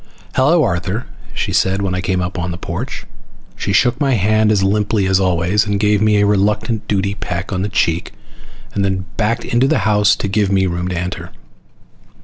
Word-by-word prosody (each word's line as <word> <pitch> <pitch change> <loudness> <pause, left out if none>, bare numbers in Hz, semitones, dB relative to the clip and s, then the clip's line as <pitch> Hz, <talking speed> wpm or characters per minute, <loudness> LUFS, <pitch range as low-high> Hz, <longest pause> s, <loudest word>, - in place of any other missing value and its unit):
"Hello, 155 +5 +3
Arthur," 100 +2 -2 0.3
she - - -3
said 95 +1 +1
when 95 -2 -1
I 90 - -1
came 90 0 -1
up 90 +1 -4
on 90 0 -2
the 85 - -5
porch. - - -5 0.5
She 100 - -3
shook 125 +7 +2
my 135 -3 +2
hand 110 +1 +2
as 100 -3 +2
limply 105 +1 +1
as 95 0 +2
always, 90 +3 +1
and 100 -1 0
gave 105 0 +2
me 110 -1 +3
a 105 - +3
reluctant 105 +2 0
duty 100 -1 0
peck 90 -1 -4
on 95 - -1
the 100 - -2
cheek, 85 -3 0 0.6
then 95 -1 0
backed 115 +1 0
into 120 +3 +2
the 135 -9 +1
house 105 -2 +4
to - - -3
give 100 0 0
me 95 -1 +2
room 90 0 -2
to 90 -1 -3
enter. 90 +1 -4
100 Hz, 195 wpm, -17 LUFS, 95-105 Hz, 0.6 s, house